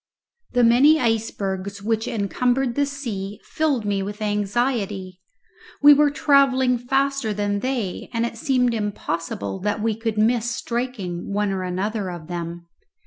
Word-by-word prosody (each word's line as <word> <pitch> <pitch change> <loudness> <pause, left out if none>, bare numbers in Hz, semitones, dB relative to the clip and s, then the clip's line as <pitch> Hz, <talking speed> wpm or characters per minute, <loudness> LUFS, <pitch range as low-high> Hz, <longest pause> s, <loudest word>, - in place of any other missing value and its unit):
The 245 0 +3
many 265 +7 +6
icebergs 200 -4 -2
which 225 +1 0
encumbered 245 +4 0
the 285 +2 +1
sea 210 -8 -5
filled 285 -8 -1
me 200 -1 0
with 205 +2 -5
anxiety. 205 -3 -1 0.6
We 290 0 +10
were 295 +1 +4
travelling 270 -4 +3
faster 270 -2 0
than 205 0 -1
they, 240 -5 -3
and 230 0 0
it 235 - -4
seemed 250 -1 +1
impossible 165 - -3
that 210 +2 -1
we 225 -1 +1
could 225 -1 -3
miss 230 +2 +2
striking 235 -8 -4
one 205 0 0
or 190 -1 -2
another 190 +3 -2
of 175 -3 -7
them. 170 0 -6
220 Hz, 140 wpm, -23 LUFS, 195-250 Hz, 0.6 s, We